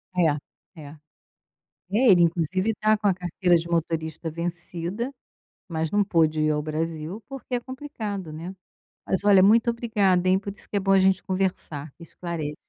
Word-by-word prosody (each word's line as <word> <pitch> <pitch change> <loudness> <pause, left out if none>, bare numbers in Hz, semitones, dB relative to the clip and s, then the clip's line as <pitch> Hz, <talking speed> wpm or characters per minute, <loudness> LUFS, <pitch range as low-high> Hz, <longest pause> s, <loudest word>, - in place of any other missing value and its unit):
É, 160 0 -2
é. 145 +1 -11 0.9
É, 230 +1 +5
ele 175 -2 +6
inclusive 175 +5 +1
tá 215 0 +3
com 205 -1 0
a 190 - +4
carteira 175 0 +1
de 170 +1 -5
motorista 160 -1 -2
vencida, 175 - -4 0.6
mas 160 -1 -2
não 205 0 +2
pôde 160 -4 +2
ir 155 - +2
ao 150 0 +1
Brasil, 160 +5 -4
porque 270 -2 -6
é 240 - 0
complicado, 220 - -6
né. 170 +5 -7 0.5
Mas 190 - 0
olha, 195 -2 +6
muito 225 +4 +5
obrigada, 205 -6 +1
hein, 190 +1 +4
por 200 0 -6
isso - - -2
que 205 - -3
é - - +2
bom 195 0 +2
a 195 - +6
gente 190 0 +3
conversar, 180 -6 -3
que 170 - -15
esclarece. 165 -3 -5
180 Hz, 175 wpm, -25 LUFS, 160-205 Hz, 0.9 s, ele